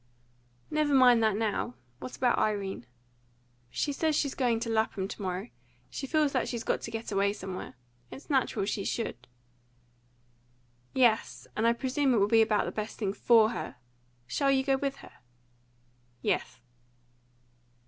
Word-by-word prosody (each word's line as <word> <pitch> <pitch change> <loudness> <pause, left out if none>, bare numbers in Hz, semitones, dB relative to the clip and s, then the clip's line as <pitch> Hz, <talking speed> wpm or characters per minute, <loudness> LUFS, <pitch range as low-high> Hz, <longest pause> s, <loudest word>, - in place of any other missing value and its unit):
"Never 300 -2 +2
mind 250 -3 +6
that 220 -2 +3
now. 210 - -1 0.2
What 255 - -7
about 245 -2 +2
Irene?" 200 - -1 0.8
"She 285 - -1
says 315 +1 +1
she's 280 -2 0
going 240 -4 +1
to 230 - -2
Lapham 220 -3 0
to - - -8
morrow. 190 +4 -3 0.4
She 270 - -5
feels 305 0 +2
that 255 -3 0
she's 235 -2 -3
got - - 0
to - - -5
get 225 0 -5
away 200 0 +2
somewhere. 190 -2 -7 0.3
It's 270 - -11
natural 265 -8 +1
she 200 0 -2
should." 125 - -3 1.7
"Yes, 240 -4 +2
and 225 +2 +2
I 235 - +5
presume 260 +2 +1
it - - +3
will 200 -1 +4
be 225 +1 +5
about 215 -1 +2
the - - -3
best 215 0 -5
thing 200 -3 -1
FOR 225 0 +5
her. 185 - -5 0.5
Shall 275 - 0
you 265 -1 +3
go 270 0 +2
with 275 0 -2
her?" - - -16 1.1
"Yes." 125 0 -1
230 Hz, 160 wpm, -29 LUFS, 205-265 Hz, 1.7 s, mind